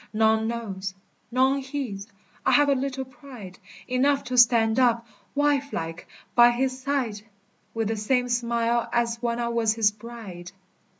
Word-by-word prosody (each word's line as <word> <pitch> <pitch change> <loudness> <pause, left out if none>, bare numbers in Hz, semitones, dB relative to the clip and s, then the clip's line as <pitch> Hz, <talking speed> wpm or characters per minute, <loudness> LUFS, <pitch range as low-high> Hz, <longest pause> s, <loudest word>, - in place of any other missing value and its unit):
None 220 0 +3
knows, 195 -5 -4 0.3
none 260 +3 +2
heeds. 260 -8 -5 0.4
I 265 - +3
have 290 +2 +5
a - - +5
little 265 0 -3
pride; 245 -7 -12 0.3
Enough 275 +3 +2
to 250 - -4
stand 230 -2 +5
up, 235 -2 +3 0.3
wifelike, 280 - -1 0.3
by 240 0 +7
his 255 +2 -1
side, 255 -6 -2 0.5
With 225 -2 -1
the 225 - 0
same 245 +4 +1
smile 235 -1 0
as 235 -1 0
when 235 -1 -1
I 235 0 -1
was 230 -2 +1
his 220 -2 +3
bride. 210 -5 -10
235 Hz, 145 wpm, -25 LUFS, 220-260 Hz, 0.5 s, by